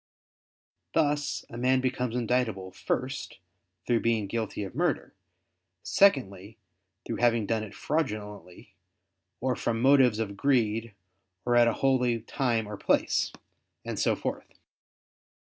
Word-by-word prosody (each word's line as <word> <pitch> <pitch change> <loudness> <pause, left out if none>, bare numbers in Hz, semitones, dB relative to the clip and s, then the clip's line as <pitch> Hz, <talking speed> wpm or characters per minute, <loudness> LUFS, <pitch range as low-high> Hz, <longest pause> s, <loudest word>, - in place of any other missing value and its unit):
Thus 145 -2 +1
a 115 - -9
man 130 +1 +3
becomes 125 -2 -1
indictable, 115 -6 -1
first, 130 +4 -3 0.5
through 120 -2 +2
being 115 -3 +1
guilty 110 0 -3
of 95 - -7
murder; 160 0 -1 0.7
secondly, 110 - +2 0.5
through 115 - -3
having 115 -2 +2
done 110 0 -1
it 105 - -9
fraudulently, 105 - -4 0.7
or 130 0 0
from 115 -1 -1
motives 130 -3 +5
of 105 -3 -3
greed 115 -3 +1 0.5
or 120 0 +2
at 120 -1 +6
a 115 - +2
holy 125 -3 +2
time 115 -2 -1
or 105 -1 -6
place, - - +1 0.5
and - - -4
so - - +2
forth. - - -5
115 Hz, 125 wpm, -28 LUFS, 110-130 Hz, 0.7 s, at